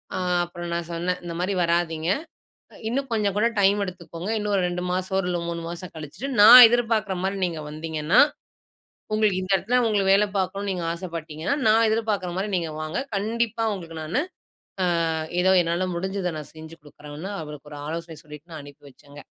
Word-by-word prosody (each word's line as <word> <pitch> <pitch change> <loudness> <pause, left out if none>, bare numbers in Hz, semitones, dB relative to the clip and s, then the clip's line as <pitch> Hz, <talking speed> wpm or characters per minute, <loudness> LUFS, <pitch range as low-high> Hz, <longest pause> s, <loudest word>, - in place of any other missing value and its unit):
ஆ - - -2 0.3
அப்புறம் 175 0 -7
நான் 170 0 -3
சொன்னேன், 180 +2 -2
இந்த 170 - -5
மாதிரி 190 +2 0
வராதீங்க. 170 -1 0 0.8
இன்னும் 270 +4 -1
கொஞ்சம் 205 -3 0
கூட 220 - +3
டைம் 200 +1 +4
எடுத்துக்கோங்க. 175 0 -7
இன்னும் 210 -1 -2
ஒரு 190 - +2
2 175 0 -3
மாசம் 185 +1 -1
இல்ல 180 -1 0
ஒரு 170 - -5
3 170 0 -4
மாசம் 175 +1 -8
கழிச்சுட்டு, 155 - -7
நான் 240 +3 +12
எதிர்பார்க்குற 225 -4 0
மாரி 195 +1 -1
நீங்க 165 -3 -4
வந்தீங்கன்னா, 155 +5 0 0.9
உங்களுக்கு 215 -3 +2
இந்த 185 +1 -5
இடத்துல 235 +7 +1
உங்களுக்கு 200 -3 +2
வேல 205 +2 +4
பார்க்கணும்னு 195 +2 -2
நீங்க 180 -2 -3
ஆசைப்பட்டீங்கன்னா 165 - -4
நான் 225 +1 +5
எதிர்பார்க்குற 215 -4 -1
மாரி 195 - -1
நீங்க 170 -3 -1
வாங்க. 155 +1 -4 0.2
கண்டிப்பா 225 +2 -1
உங்களுக்கு 165 -4 -8
நானு 155 +11 -1 0.9
ஆ - - -1 0.3
ஏதோ 190 +1 +4
என்னால 170 +2 -1
முடிஞ்சத 190 0 -2
நான் 150 - -10
செஞ்சு 160 +1 -10
குடுக்குறேன்னு, 150 +5 -9
அவருக்கு 150 -1 -9
ஒரு 145 - -8
ஆலோசனை 165 0 -6
சொல்லிட்டு 150 +3 -13
நான் 155 - -7
அனுப்பி 145 0 -15
வச்சேங்க. 145 +2 -15
180 Hz, 175 wpm, -24 LUFS, 165-200 Hz, 0.9 s, நான்